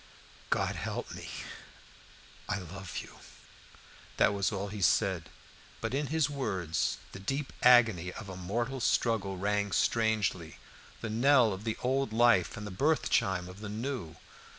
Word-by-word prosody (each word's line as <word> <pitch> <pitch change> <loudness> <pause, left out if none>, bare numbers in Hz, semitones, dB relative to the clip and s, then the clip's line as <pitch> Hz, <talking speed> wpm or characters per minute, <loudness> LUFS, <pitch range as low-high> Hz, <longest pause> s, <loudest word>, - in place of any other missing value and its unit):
"God - - 0
help - - -4
me - - -8 1.2
I 105 - 0
love 95 0 -7
you." - - -15 1.0
That - - +4
was 100 0 0
all 100 0 -3
he 105 0 -6
said, - - +2 0.5
but 115 +1 -3
in 145 +1 0
his 160 +1 +2
words 95 - -1
the - - -8
deep 135 +8 -3
agony 110 -8 +5
of 110 - -8
a 95 - -7
mortal 120 +9 -2
struggle 110 -5 +1
rang 100 +1 0
strangely 110 -8 +1 0.4
the 110 - -3
knell 120 -1 +4
of 95 +4 -8
the 110 - -1
old 130 -2 0
life 115 -6 +4
and 105 - -6
the 105 - -6
birth 145 +9 +1
chime 95 -5 +1
of 90 +2 -10
the 105 -1 -6
new. 110 - -4
105 Hz, 150 wpm, -31 LUFS, 95-125 Hz, 1.2 s, agony